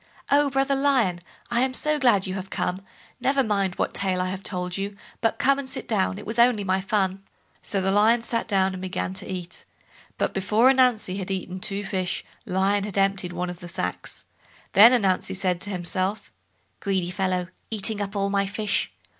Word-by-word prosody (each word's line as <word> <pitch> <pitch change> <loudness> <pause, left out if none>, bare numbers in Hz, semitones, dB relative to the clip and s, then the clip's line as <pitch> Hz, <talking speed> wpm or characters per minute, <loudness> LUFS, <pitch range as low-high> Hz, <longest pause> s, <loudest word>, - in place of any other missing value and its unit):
"Oh! 285 0 +4
brother 270 +1 +1
Lion, 265 -10 +2 0.3
I 235 0 +2
am 260 0 0
so 305 +2 +1
glad 235 -8 +4
you 185 - -3
have 190 0 -5
come; 185 -1 -2 0.4
never 270 +2 +2
mind 200 -4 0
what - - -1
tale 190 -2 0
I 185 0 0
have 190 0 -5
told 180 -2 -3
you, 200 +1 -3 0.3
but 225 - +1
come 275 +1 +3
and 270 -2 -6
sit - - -5
down—it 195 -3 0
was 225 +3 -3
only 235 -3 +4
my 190 0 +1
fun." 195 -1 0 0.4
So 200 - -2
Lion 210 +5 +3
sat 230 -2 -2
down 190 -2 +2
and 185 - -6
began 185 0 -3
to 190 0 -7
eat; 180 -1 -6 0.5
but - - 0
before 210 +7 +4
Ananzi 245 -8 +2
had 190 -1 -4
eaten 185 -1 -4
two 200 +2 -2
fish, 185 -2 -2 0.2
Lion 195 +2 +1
had 205 -1 -5
emptied 195 -2 +1
one 180 +1 -2
of 175 - -10
the 175 - -9
sacks. 90 - -3 0.5
Then 215 +5 +9
said 245 -4 +3
Ananzi 185 -1 0
to 205 - -1
himself: 185 +2 -2 0.5
"Greedy 190 -3 -1
fellow, 185 -2 -1 0.2
eating 215 -1 0
up 200 +1 -4
all 200 0 0
my 200 -1 +1
fish." 205 +1 -1
195 Hz, 190 wpm, -25 LUFS, 185-225 Hz, 0.5 s, Then